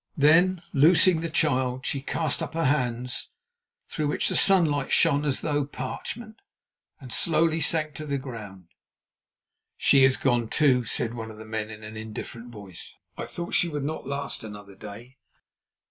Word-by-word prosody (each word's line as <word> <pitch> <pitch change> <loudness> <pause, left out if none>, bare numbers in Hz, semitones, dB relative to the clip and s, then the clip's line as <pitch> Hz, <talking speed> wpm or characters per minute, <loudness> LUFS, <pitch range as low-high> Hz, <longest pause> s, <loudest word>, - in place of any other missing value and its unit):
Then, 170 +5 +4
loosing 165 +3 +5
the 165 - -3
child, 130 -5 0
she 140 - -1
cast 155 +3 -1
up 160 -1 -5
her 165 -1 0
hands, 125 -3 0 0.6
through 150 - -2
which 145 - 0
the - - -1
sunlight 160 -8 +3
shone 145 -3 +4
as 140 -3 -1
through 145 -2 0
parchment, 215 - -6 0.6
and 130 -5 -8
slowly 160 +4 +2
sank 155 0 0
to 155 - -6
the 140 -1 0
ground. 105 -9 -9 1.1
"She 135 - +5
has 130 0 +5
gone, 120 -3 +1
too," 130 -5 +3
said 115 +1 -2
one 115 -2 -6
of 110 - -11
the 110 - -10
men 110 0 -4
in 110 0 -10
an 110 +1 -8
indifferent 110 +2 -7
voice. 100 -6 -10 0.2
"I - - -5
thought 170 0 -6
she 175 - +3
would 145 -3 -3
not 155 +3 -4
last 140 -3 -3
another 105 -2 -10
day." 115 +6 -11
135 Hz, 165 wpm, -26 LUFS, 115-155 Hz, 1.1 s, loosing